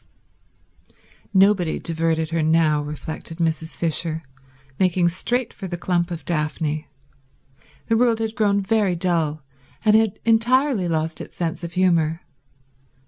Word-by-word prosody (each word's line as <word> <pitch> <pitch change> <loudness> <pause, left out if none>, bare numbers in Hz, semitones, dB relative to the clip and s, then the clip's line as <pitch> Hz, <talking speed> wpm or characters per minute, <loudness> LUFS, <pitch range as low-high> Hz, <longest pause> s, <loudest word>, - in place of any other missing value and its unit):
Nobody 190 -4 +3
diverted 160 -1 -1
her 165 -1 0
now, 155 -1 +3
reflected 150 +2 -6
Mrs. 160 -1 -2
Fisher, 165 -1 0 0.6
making 180 -2 +3
straight 240 +8 -1
for 195 - -7
the 175 -1 -4
clump 175 0 0
of 170 -2 -6
daphne; 155 -1 -2 1.0
the 225 - +1
world 235 -1 +3
had 220 -1 -2
grown 205 -3 +2
very 205 -2 +1
dull, 165 -4 0 0.4
and 215 0 +5
had 220 -3 +3
entirely 235 -1 +3
lost 160 -1 -2
its - - -11
sense 170 0 -3
of 170 0 -6
humour. 170 -3 +2
170 Hz, 130 wpm, -22 LUFS, 160-200 Hz, 1.0 s, and